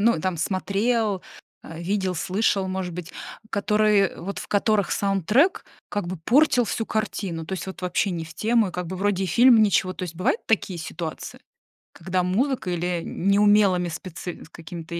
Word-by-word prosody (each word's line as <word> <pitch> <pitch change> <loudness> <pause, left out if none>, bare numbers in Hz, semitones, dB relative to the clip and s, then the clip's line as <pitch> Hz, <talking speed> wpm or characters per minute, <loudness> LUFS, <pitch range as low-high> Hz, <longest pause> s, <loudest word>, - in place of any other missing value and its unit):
ну, 230 -3 +3
там 185 +1 -1
смотрел, 200 +4 0 0.4
э, 165 0 -9
видел, 190 +1 -1
слышал, 195 +2 0
может 185 -2 -3
быть, 180 0 -7 0.4
которые 210 -1 +2
вот, 195 +3 -5
в - - -8
которых 205 -1 +1
саундтрек 205 - +2 0.2
как 205 -3 -3
бы 185 +2 -4
портил 250 - +3
всю 225 +1 -3
картину? 195 -6 -3
То - - -7
есть 190 - -4
вот 190 -1 -8
вообще 180 +2 0
не 165 -2 -3
в 160 - -12
тему, 225 +3 +2
и 180 - -9
как 180 -1 -4
бы 185 - -5
вроде 195 0 0
и - - -1
фильм 235 +4 +6
ничего, 195 -2 +2
то 185 - -8
есть 175 -2 -5
бывают 185 - 0
такие 195 -5 0
ситуации, 160 0 -6 0.5
когда 185 +2 -1
музыкой 205 0 0
или 175 0 -2
неумелыми 200 -2 +3
спецэ 175 +1 -7
какими-то 170 +1 -7
190 Hz, 170 wpm, -24 LUFS, 175-210 Hz, 0.5 s, фильм